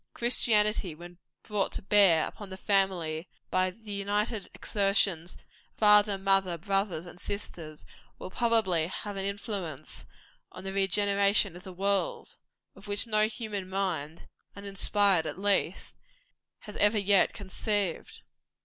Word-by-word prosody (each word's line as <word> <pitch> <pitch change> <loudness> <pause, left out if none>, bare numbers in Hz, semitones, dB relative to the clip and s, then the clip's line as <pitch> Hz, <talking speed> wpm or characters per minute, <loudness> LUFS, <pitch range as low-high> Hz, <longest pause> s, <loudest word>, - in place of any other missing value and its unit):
Christianity, 215 -6 +1
when 175 +2 -12 0.2
brought 210 -2 0
to - - -5
bear 190 -5 +5
upon 205 -2 -9
the 190 - -8
family 185 -5 0 0.2
by 185 0 +2
the 210 +3 -12
united 205 +2 -2
exertions 195 -4 +1
of - - -17 0.4
father, 210 -1 +5
mother, 195 -2 +1
brothers 195 -2 -1
and 175 0 -12
sisters, 165 -7 -6 0.3
will - - -8
probably 215 -8 +1
have 205 +3 -4
an 195 0 -3
influence 200 - -5 0.4
on - - -10
the 195 0 -5
regeneration 200 0 +2
of 175 - -10
the 190 - -9
world, 200 - -2 0.4
of - - -15
which 205 +2 -2
no 215 -1 +2
human 215 -4 -6
mind 175 -5 -3 0.3
uninspired 200 -3 +1
at - - -5
least 200 +1 -1 0.7
has 210 - -11
ever 205 +1 +3
yet 200 -2 +4
conceived. 200 -2 -3
195 Hz, 130 wpm, -29 LUFS, 185-205 Hz, 0.7 s, bear